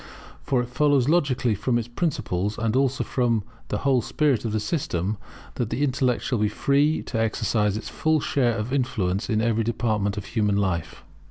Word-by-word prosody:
For 125 -3 +1
it 120 - -8
follows 140 0 +2
logically 140 -8 +2
from 115 +4 0
its 120 -1 -2
principles, 110 - -2
and 115 -1 0
also 135 0 +2
from 115 -4 0 0.2
the - - -2
whole 130 -3 +4
spirit 140 -2 +1
of 110 - -1
the 110 - 0
system, 105 - -2 0.4
that 120 -3 -1
the 120 +6 -1
intellect 130 -3 +1
shall 120 - -1
be 105 0 +2
free 140 +7 +2
to 115 - -3
exercise 110 -2 +1
its 110 - -6
full 155 0 +1
share 120 -5 +1
of 110 +5 -3
influence 110 -6 -1
in 110 -1 +2
every 115 -1 +1
department 110 -3 -1
of 100 - -4
human 105 -2 0
life. 85 -5 -2
120 Hz, 185 wpm, -24 LUFS, 105-135 Hz, 0.4 s, whole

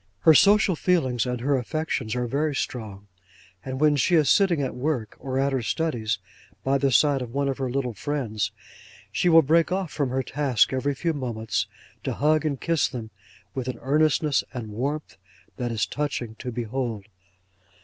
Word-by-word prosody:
'Her 160 - +7
social 200 +3 +5
feelings, 130 -10 +1
and 125 -1 -2
her 140 +3 +2
affections, 130 -4 -2
are 125 0 -1
very 145 +4 -1
strong; 105 -7 -4 0.6
and 130 0 -5
when 150 0 +4
she 170 +5 +3
is 155 -4 +4
sitting 190 -6 +4
at 135 -2 -1
work, 125 -5 -2
or 130 -1 -3
at 135 +1 +1
her 130 - 0
studies, 115 -5 -1 0.5
by 135 +1 +2
the 135 0 +2
side 140 +1 +4
of 120 0 -7
one 140 0 +1
of 135 0 -2
her 130 -1 -1
little 125 -1 -1
friends, 110 -5 -2 0.6
she 180 - +2
will 165 -1 +7
break 165 +5 +3
off 185 -4 -1
from 140 0 -1
her 130 +1 -1
task 135 -5 +1
every 140 +2 0
few 165 +4 -1
moments, 115 -6 -2 0.4
to - - -2
hug 155 +1 +2
and 140 -3 -2
kiss 165 -2 +1
them 115 -4 -7 0.4
with 130 -3 -4
an 130 - -3
earnestness 150 +1 +2
and 115 -3 -5
warmth 140 +8 -3 0.4
that 120 -2 -2
is 110 -2 0
touching 135 -6 -3
to 125 - -4
behold. 115 -2 -3
135 Hz, 180 wpm, -25 LUFS, 120-150 Hz, 0.6 s, Her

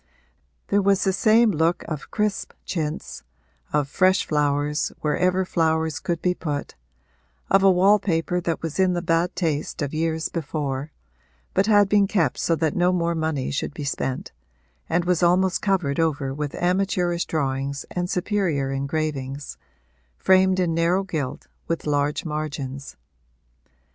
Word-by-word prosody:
There 200 0 +3
was 195 0 +3
the 190 - +2
same 220 +3 +4
look 165 0 +1
of 155 -4 -5
crisp 210 -1 -2
chintz, 155 -4 -4 0.5
of 145 -2 +1
fresh 185 +6 +3
flowers 150 0 0
wherever 180 +5 +1
flowers 160 -2 0
could 170 -2 -3
be 180 - +2
put, 150 -5 -4 0.8
of 195 - +5
a 195 - +6
wall 195 +3 +5
paper 180 -1 0
that 165 -2 -2
was 165 +2 -4
in 185 -1 +4
the 175 -1 -2
bad 170 +1 +1
taste 160 -5 -2
of 145 - -4
years 160 0 -1
before, 145 -3 -3 0.6
but 195 +2 +2
had 205 -2 +5
been 200 0 +3
kept 175 - 0
so 165 - +1
that 160 -1 -1
no 175 +1 +3
more 170 -2 0
money 160 -5 -2
should 140 - -3
be 150 - -5
spent, 135 -2 -3 0.6
and 170 +1 +1
was 180 -1 +1
almost 180 +2 +3
covered 180 -9 0
over 145 -4 0
with 145 0 -4
amateurish 180 -1 0
drawings 140 -2 -2
and 180 0 -2
superior 180 -8 0
engravings, 140 -1 -3 0.6
framed 190 - +4
in 175 -3 +1
narrow 170 +4 +2
gilt 155 -9 -4 0.2
with 165 - -2
large 145 +1 0
margins. 145 -3 -5
165 Hz, 150 wpm, -24 LUFS, 150-185 Hz, 0.8 s, a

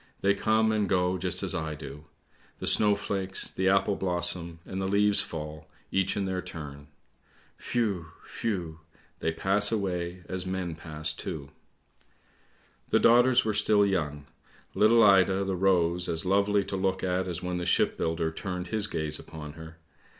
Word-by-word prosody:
They 100 +1 +3
come 110 +2 +2
and 105 -3 0
go 90 -1 +1
just 90 +1 -1
as 95 - +1
I 80 -3 -3
do. 75 +1 -10 0.5
The - - -6
snowflakes, 100 -2 +2
the 95 0 0
apple 100 +1 +2
blossom, 85 -2 -1
and 95 0 -5
the 95 - -1
leaves 100 +1 +3
fall, 75 -1 -7 0.2
each 95 0 0
in 100 - -1
their 95 -1 -2
turn. 75 -5 -9 0.8
Whew! 100 -9 0 0.3
whew! 85 -8 -3 0.4
they 80 - -1
pass 100 +5 +3
away, 90 -4 -3
as 95 -1 -4
men 95 -2 -3
pass 80 -1 -3
too! 70 -3 -7 0.7
" - - -36
The - - +4
daughters 125 +1 +5
were 110 - 0
still 105 0 +3
young. 75 -7 -2 0.5
Little 115 +2 +5
Ida, 95 -1 +4
the 95 -1 -2
rose, 90 -1 +1
as 80 +2 -2
lovely 100 +2 +2
to 95 - -5
look 95 0 -1
at 95 0 0
as 90 -1 -4
when 90 0 -2
the 90 - -3
shipbuilder 80 0 +1
turned 90 +1 -5
his 105 0 0
gaze 80 -5 -1
upon 75 -2 -9
her. 80 +1 -11
95 Hz, 160 wpm, -28 LUFS, 80-100 Hz, 0.8 s, daughters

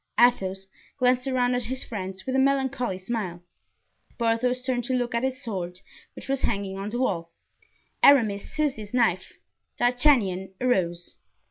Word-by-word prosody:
Athos 195 -6 +3 0.3
glanced 250 0 +2
around 250 -1 +2
at 245 -1 -1
his 260 +3 -4
friends 190 -3 -6
with 260 - -2
a - - +3
melancholy 265 -6 +1
smile. 185 -3 -4 0.7
Porthos 245 +2 +1
turned 250 -2 -1
to 260 - -1
look 245 -1 -1
at 235 - +1
his 260 0 -2
sword, 180 -5 -5 0.3
which - - -10
was 270 0 -1
hanging 200 -1 -1
on 195 +1 -4
the 235 - -3
wall; 170 -10 -1 0.7
Aramis 220 -8 +5
seized 300 -5 0
his 215 +2 -7
knife; 200 -7 +1 0.4
D'Artagnan 240 -7 +2
arose. 175 -8 0
240 Hz, 150 wpm, -26 LUFS, 190-255 Hz, 0.7 s, Aramis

